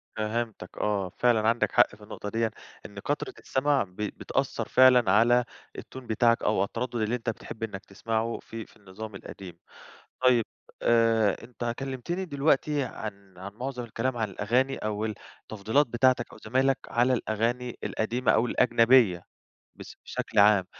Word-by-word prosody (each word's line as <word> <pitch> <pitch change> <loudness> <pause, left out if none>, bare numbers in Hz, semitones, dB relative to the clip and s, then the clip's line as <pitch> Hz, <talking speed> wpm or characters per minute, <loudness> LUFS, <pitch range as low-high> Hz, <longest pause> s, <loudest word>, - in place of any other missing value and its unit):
فهمتك 110 -2 -4
آه، 100 -3 -1
فعلًا 115 -3 +3
عندك 115 +2 +2
حق 120 -3 +4
في 105 - -17
النقطة 105 0 -7
ديًا 115 +1 0 0.3
إن 100 -1 -9
كترة 145 +8 -3
السمع 140 +1 +1
ب 90 -3 -16
بتأثر 105 0 -2
فعلًا 125 -5 +6
على 120 +4 +4 0.3
التون 130 -2 -9
بتاعك 115 +1 +2
أو 105 -2 +2
التردد 120 +4 -4
اللي 110 +1 0
أنت 120 -1 -3
بتحب 110 0 -7
إنّك 100 -3 -5
تسمعه 115 +3 -2
في 115 -1 -8
في - - -22
النظام 105 +1 -9
القديم. 95 -2 -10 0.7
طيّب، 125 -3 +5 0.4
آآ، 115 -3 +3
أنت 120 -1 -4
كلمتني 135 +8 -4
دلوقتي 145 -1 +1
عن 100 -6 -8
عن 100 +2 -8
معظم 125 +1 -5
الكلام 120 +2 -2
عن 110 -3 -1
الأغاني 125 +8 0
أو 105 0 -3 0.4
التفضيلات 110 +8 +1
بتاعتك 120 0 +1
أو - - -12
زمايلك 130 +4 +2
على 120 +2 +2
الأغاني 120 +1 -1
القديمة 120 +3 0
أو 115 - +3
الأجنبية 115 -6 +4 0.5
بس - - -11
بشكل 110 - -2
عام. 100 -2 +6
115 Hz, 150 wpm, -27 LUFS, 105-125 Hz, 0.7 s, فعلًا